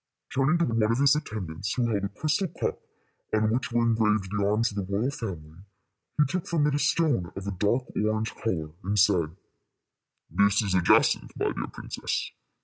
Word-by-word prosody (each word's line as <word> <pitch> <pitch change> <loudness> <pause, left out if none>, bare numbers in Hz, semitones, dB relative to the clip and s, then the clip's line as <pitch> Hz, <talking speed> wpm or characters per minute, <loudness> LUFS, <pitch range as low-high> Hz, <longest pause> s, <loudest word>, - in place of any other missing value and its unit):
Turning 135 +5 +3
to 170 - +2
one 115 -1 0
of 110 +2 +2
his 140 +1 +5
attendants, 105 - -4
who 125 - +1
held 105 -3 -1
a 100 - -1
crystal 155 - 0
cup 165 - -3 0.6
on 110 0 +2
which 125 +2 -1
were 120 0 +2
engraved 110 -4 +2
the 100 - +1
arms 110 +3 +2
of 105 - -9
the 100 -1 -3
royal 110 +7 0
family, 85 - -7 0.6
he 150 - +5
took 175 +5 -3
from 160 -4 +1
it 150 - +2
a 145 - +1
stone 140 - +1
of 95 - -6
a 100 - -2
dark 105 +7 +1
orange 110 +1 0
color, 80 -9 -3
and 105 +2 -1
said, 90 -5 +3 0.9
"This 100 +5 +3
is 100 -3 -1
a 90 - +3
jacinth, 85 - +3
my - - 0
dear - - -4
princess. - - -4
110 Hz, 195 wpm, -27 LUFS, 100-130 Hz, 0.9 s, his